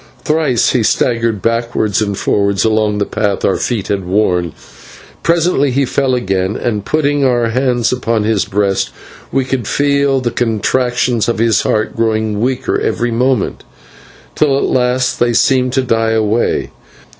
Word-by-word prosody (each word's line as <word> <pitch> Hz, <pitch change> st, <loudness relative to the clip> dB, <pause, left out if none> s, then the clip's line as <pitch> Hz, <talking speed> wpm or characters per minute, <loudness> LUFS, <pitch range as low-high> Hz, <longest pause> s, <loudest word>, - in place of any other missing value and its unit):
Thrice 150 Hz, -6 st, +1 dB
he 125 Hz, -, +1 dB
staggered 115 Hz, -1 st, 0 dB
backwards 115 Hz, -2 st, 0 dB
and 100 Hz, -2 st, -2 dB
forwards 100 Hz, 0 st, 0 dB
along 110 Hz, -1 st, +1 dB
the 100 Hz, -, 0 dB
path 100 Hz, -1 st, -1 dB
our 95 Hz, -, +1 dB
feet 115 Hz, -6 st, -2 dB
had 100 Hz, -2 st, -1 dB
worn. 90 Hz, -3 st, 0 dB, 0.8 s
Then 170 Hz, -3 st, +2 dB
he 135 Hz, +2 st, +1 dB
fell 130 Hz, 0 st, 0 dB
again, 95 Hz, -4 st, -1 dB
and, 105 Hz, -4 st, -2 dB
putting 145 Hz, +2 st, 0 dB
our 120 Hz, -3 st, +2 dB
hands 125 Hz, -1 st, 0 dB
upon 115 Hz, -3 st, -1 dB
his 105 Hz, -2 st, +1 dB
breast, 100 Hz, -1 st, 0 dB, 0.4 s
we 135 Hz, -1 st, 0 dB
could 130 Hz, -4 st, -3 dB
feel 140 Hz, -1 st, +1 dB
the 120 Hz, -2 st, -2 dB
contractions 120 Hz, +1 st, 0 dB
of 120 Hz, -, -1 dB
his 115 Hz, -1 st, +2 dB
heart 110 Hz, 0 st, -1 dB
growing 110 Hz, -2 st, 0 dB
weaker 130 Hz, +1 st, -1 dB
every 120 Hz, 0 st, -1 dB
moment, 125 Hz, -1 st, 0 dB, 0.7 s
till 135 Hz, -, +2 dB
at -, -, 0 dB
last 125 Hz, 0 st, 0 dB
they 120 Hz, 0 st, +2 dB
seemed 130 Hz, +1 st, +2 dB
to 130 Hz, -, +1 dB
die 115 Hz, -2 st, +1 dB
away. 110 Hz, +1 st, 0 dB
115 Hz, 155 wpm, -15 LUFS, 105-130 Hz, 0.8 s, Then